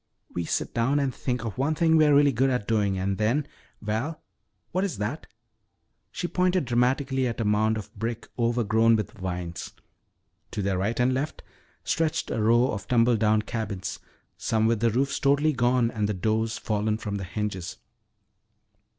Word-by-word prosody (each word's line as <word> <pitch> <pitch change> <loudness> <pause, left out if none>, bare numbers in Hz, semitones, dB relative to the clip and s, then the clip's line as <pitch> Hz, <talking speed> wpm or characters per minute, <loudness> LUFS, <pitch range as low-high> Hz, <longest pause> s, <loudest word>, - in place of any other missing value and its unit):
"We 85 - -2
sit - - -2
down 125 +5 +1
and 135 -2 0
think 125 -2 -3
of 110 +1 -5
one 150 +4 +1
thing 160 0 +3
we're 155 -2 +5
really 145 0 +5
good 135 +2 +2
at 125 -6 -1
doing 105 -4 +1
and 95 +1 -1
then 120 +7 +1 0.4
Val, 115 +10 -2 0.5
what 185 +2 0
is 185 - -2
that?" 110 +10 -4 0.8
She 175 - -3
pointed 180 -2 +1
dramatically 130 +2 +1
at 120 - -4
a 115 - 0
mound 110 +1 +2
of 105 - -8
brick 115 +2 -4
overgrown 115 -1 +3
with 105 - -2
vines. 90 -5 -5 0.8
To 105 - -3
their 95 -1 0
right 105 +6 -1
and 125 +1 +3
left 140 +4 -3 0.4
stretched 160 -1 0
a 110 - -1
row 120 +4 +4
of 105 -2 -5
tumble 120 0 +4
down 110 0 +2
cabins, 105 -5 -4 0.4
some 110 -1 +1
with 115 -1 +2
the 115 +1 +3
roofs 135 +5 0
totally 145 +2 +3
gone 120 -1 +2
and 105 -2 -1
the 105 - -1
doors 110 +4 0
fallen 105 0 -1
from 105 -2 -4
the 95 - -5
hinges. 95 -1 -4
115 Hz, 175 wpm, -26 LUFS, 105-130 Hz, 0.8 s, we're